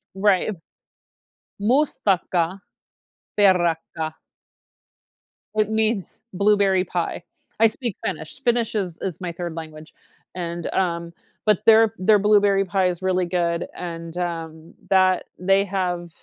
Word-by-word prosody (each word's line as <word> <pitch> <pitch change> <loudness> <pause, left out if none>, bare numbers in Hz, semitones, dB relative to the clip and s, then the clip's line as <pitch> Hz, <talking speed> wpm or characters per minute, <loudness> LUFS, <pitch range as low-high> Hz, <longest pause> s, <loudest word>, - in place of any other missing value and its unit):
Right. 195 +1 +2 1.0
Mustikkapiirakka. 195 - +1 3.0
It 215 -1 +2
means 220 -2 -1
blueberry 200 -1 +3
pie. 175 -1 -3 0.4
I 225 - +7
speak 230 -1 -4
Finnish; 160 +6 -5
Finnish 235 -2 +1
is 185 -6 -2
is 185 -4 -4
my 180 -2 -3
3rd 170 -1 -6
language, 155 -1 -9 0.4
and, 170 -1 -4
um 170 -2 -1 0.3
but 210 0 +2
their 225 -1 +6
their 210 +3 +4
blueberry 205 -1 +4
pie 190 0 +1
is 180 -1 -3
really 185 -1 +1
good 170 -1 -1
and, 165 -1 -7
um, 165 -2 -5 0.2
that 185 -1 +4 0.2
they 195 +2 +3
have 180 -3 -2
185 Hz, 110 wpm, -23 LUFS, 170-205 Hz, 3.0 s, I